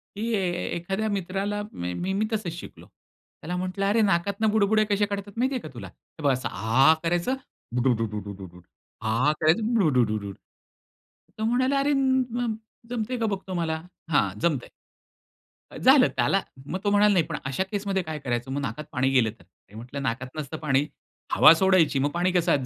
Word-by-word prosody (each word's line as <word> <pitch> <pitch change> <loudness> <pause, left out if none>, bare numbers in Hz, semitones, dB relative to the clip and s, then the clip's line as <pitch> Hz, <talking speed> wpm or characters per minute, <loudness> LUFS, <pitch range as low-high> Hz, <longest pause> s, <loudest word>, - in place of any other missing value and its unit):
की 225 +3 -2
एखाद्या 190 +1 -1
मित्राला 200 +1 -2
मी 90 - -3
मी 205 +3 +1
तसंच 205 -6 -2
शिकलो. - - -11
त्याला 175 +3 -11
म्हंटलं, 185 +2 -2
"अरे, 210 +3 +3
नाकातून 200 +2 +1
बुडबुडे 215 0 +3
कसे 205 0 +2
काढतात, 200 0 -5
माहिती 260 +3 +1
आहे 250 - -2
का 155 - -8
तुला? 110 -6 -8
हे 150 - -16
बघ 140 - +4
असं 125 -1 -3
आ 130 +8 +4
करायचं 175 +9 0 0.4
बुडूडूड, 105 -7 -2 0.4
आ 115 +6 +2
करायचं 215 +9 +2
बुडूडूड." 115 - +1 1.0
तो 215 - -3
म्हणाला, 255 +4 +2
"अरे, 285 +1 +2 1.0
जमतंय 245 +1 -2
का 225 - 0
बघतो 195 -3 -3
मला?" 160 -2 -1 0.3
"हां, 145 -9 +3
जमतंय." 150 -8 0 1.0
अ, - - -9
झालं. - - +6
त्याला - - +2 0.2
मग 185 +6 -4
तो 205 - +2
म्हणाला, 205 0 +5
"नाही, 175 -4 +3
पण - - -4
अशा 135 +7 -1
केसमध्ये 200 -2 -1
काय 155 -2 -5
करायचं? 120 -2 -3
मग 140 +1 -2
नाकात 150 +2 -4
पाणी 130 0 +1
गेलं 125 -4 +3
तर?" - - -18 0.3
मी 105 - -16
म्हटलं, 125 +5 -7
"नाकात 130 +1 -2
नसतं 150 +1 -5
पाणी, 140 -2 +1 0.5
हवा - - +8
सोडायची, 180 -5 +3
मग 140 +2 +1
पाणी 175 +2 +1
कसं 175 -1 +2
आत 140 -4 +1
170 Hz, 170 wpm, -26 LUFS, 130-205 Hz, 1.0 s, हवा